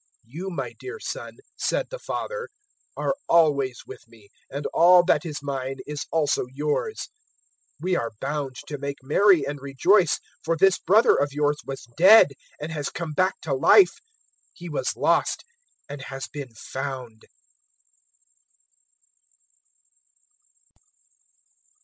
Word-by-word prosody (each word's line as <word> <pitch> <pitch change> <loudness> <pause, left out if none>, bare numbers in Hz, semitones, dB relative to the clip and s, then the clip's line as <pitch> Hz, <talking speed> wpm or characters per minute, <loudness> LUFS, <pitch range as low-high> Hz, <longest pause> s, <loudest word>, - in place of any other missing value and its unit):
015:031 170 - -5
"`You - - -7
my - - -4
dear 400 +4 -7
son,' - - -6 0.2
said - - -1
the - - -6
father, 485 -1 -5 0.5
`are - - 0 0.2
always 140 -7 +3
with - - -11
me, 110 -3 -20 0.2
and 140 +1 -5
all 175 +1 +7
that 180 - +2
is 150 -2 -6
mine 135 -1 -3
is 150 +1 -5
also 145 -6 +1
yours. 150 - -2 0.7
015:032 - - -22
We 185 0 +1
are 115 - -3
bound 140 -1 -3
to 145 -2 -6
make 140 0 -4
merry 170 +2 +4
and 145 0 -5
rejoice, 155 +7 +3 0.2
for 165 +1 0
this 190 +2 +4
brother 210 +6 +4
of 140 -1 0
yours 145 0 +1
was 135 -3 -7
dead 190 -1 +8 0.3
and 150 +2 -5
has 145 -3 -3
come 165 -2 -5
back 185 +4 +1
to 150 - -2
life, 250 - +5 0.5
he - - -10
was - - -2
lost - - +1 0.4
and 145 -1 -8
has 135 0 -6
been 135 -6 -8
found.'" 130 -2 -7
145 Hz, 135 wpm, -24 LUFS, 135-175 Hz, 0.7 s, dead